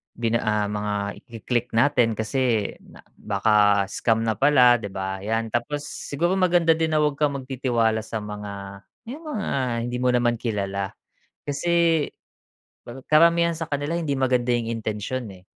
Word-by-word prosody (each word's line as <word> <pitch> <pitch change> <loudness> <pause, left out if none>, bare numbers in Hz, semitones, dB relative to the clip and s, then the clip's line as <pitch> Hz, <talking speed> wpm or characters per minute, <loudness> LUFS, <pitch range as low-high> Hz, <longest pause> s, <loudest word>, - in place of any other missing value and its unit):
bina 115 0 0
ah, 105 -1 0
mga 105 0 -2 0.3
iki-click 120 +1 -3
natin 115 -2 +3
kasi, 110 -1 0
na - - -17 0.2
baka 105 0 +3
scam 115 -1 +1
na 110 -2 -1
pala, 125 -4 +6
'di 100 - -5
ba? 95 0 -4
Yan, 110 +3 -2
tapos 145 +6 -2
siguro 160 +4 -2
maganda 175 -2 +4
din 160 -1 +1
na, 155 - +3
huwag 150 -1 0
kang 145 -2 +1
magtitiwala 125 -4 0
sa 110 -2 -5
mga, 100 -1 -8 0.3
yung 310 +5 -9
mga, 210 - -3 0.4
hindi 120 +1 -3
mo 125 - +2
naman 120 -1 +1
kilala, 100 -4 -3 0.5
kasi 165 +1 +1 0.8
kar 130 +2 -9
karamihan 170 +2 +5
sa 165 - -4
kanila 145 +2 -2
hindi 155 -4 -1
maganda 125 -2 +1
yung 115 -1 -1
intensyon 115 +2 -3
eh. 90 0 -17
120 Hz, 155 wpm, -24 LUFS, 105-145 Hz, 0.8 s, pala